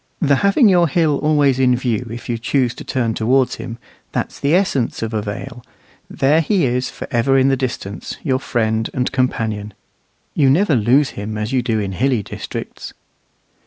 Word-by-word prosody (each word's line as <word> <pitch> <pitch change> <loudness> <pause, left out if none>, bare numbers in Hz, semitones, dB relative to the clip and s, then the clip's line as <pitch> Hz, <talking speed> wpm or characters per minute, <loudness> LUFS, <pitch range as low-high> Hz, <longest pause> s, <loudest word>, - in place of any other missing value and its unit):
The 140 -4 +3
having 200 - +4
your 175 -3 +4
hill 155 -2 +1
always 145 -4 +2
in 125 -1 +4
view 125 -1 -2
if 115 +1 -8
you 115 -1 -2
choose 125 0 0
to - - -9
turn 120 -4 -1
towards 125 +4 +1
him 115 - -7 0.4
that's - - -3
the 145 +4 +2
essence 140 -13 0
of 115 0 -4
a 110 - 0
vale. 115 +4 -7 0.5
There 150 +4 +2
he 175 0 +1
is 125 0 -1
for - - -8
ever 130 +3 +2
in 135 0 +4
the 135 - +3
distance, 125 -6 -5
your 130 -4 +1
friend 110 -4 -1
and 125 0 0
companion. 110 -5 -2 0.6
You 140 -3 +3
never 165 +4 +3
lose 130 +5 +3
him 105 +1 -5
as 110 +4 -3
you 130 - +2
do 115 -2 -1
in 100 -2 -3
hilly 120 +2 0
districts. - - -7
125 Hz, 185 wpm, -19 LUFS, 115-140 Hz, 0.6 s, having